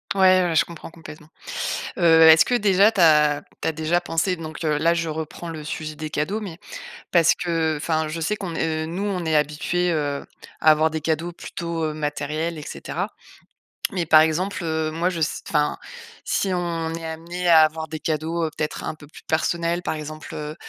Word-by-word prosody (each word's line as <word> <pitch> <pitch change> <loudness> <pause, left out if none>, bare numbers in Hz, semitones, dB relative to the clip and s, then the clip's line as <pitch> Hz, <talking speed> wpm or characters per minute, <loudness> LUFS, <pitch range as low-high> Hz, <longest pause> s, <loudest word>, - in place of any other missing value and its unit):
Ouais, 185 -1 +5
ouais, 170 -2 0
je - - +4
comprends 170 -1 -10
complètement. 160 -2 -12 0.7
Heu, 165 -2 +5
est-ce 160 0 +8
que 245 - +1
déjà 200 -1 +4
tu 200 - -4
as 150 -2 +5 0.2
tu - - -1
as - - +2
déjà 160 +3 0
pensé 175 +2 0
donc 155 0 -7
heu 150 -1 +1
là, 170 +2 +3
je 165 0 -1
reprends 160 +2 -5
le 155 -2 -6
sujet 155 0 -5
des 155 +1 -6
cadeaux 170 +9 -2
mais 185 -6 -7 0.5
parce 170 -2 +5
que 165 -3 -1
enfin, 160 +1 -1
je 165 +2 -4
sais 210 +7 -1
qu'on 185 -5 -5
est 160 0 -1
nous, 175 +5 -4
on 185 -4 -2
est 160 -1 0
habitué, 150 +4 +1
heu, 145 -2 -2 0.4
à 155 - +6
avoir 155 +1 +4
des 160 - -3
cadeaux 160 +2 -1
plutôt, 170 -1 -5
heu, 155 - -2
matériels 155 +2 -3
et - - -7
cetera. - - -4 0.8
Mais 175 -3 -1
par 155 0 +7
exemple, 175 +5 0
heu, 160 -1 -1
moi 170 +3 0
je 170 -3 -4
ce 155 - 0
enfin, 150 -2 +1 0.5
si 195 -2 0
on 170 -2 -2
est 165 0 -6
amenés 170 +3 -5
à 160 -1 +8
avoir 160 +1 +1
des 155 0 -6
cadeaux 160 +1 -1
peut-être 150 - -3
un - - -3
peu 150 -1 -15
plus 150 - -15
personnels, 170 +2 0
par - - -2
exemple, 155 0 -8
heu, 150 0 -5
160 Hz, 205 wpm, -23 LUFS, 155-170 Hz, 0.8 s, est-ce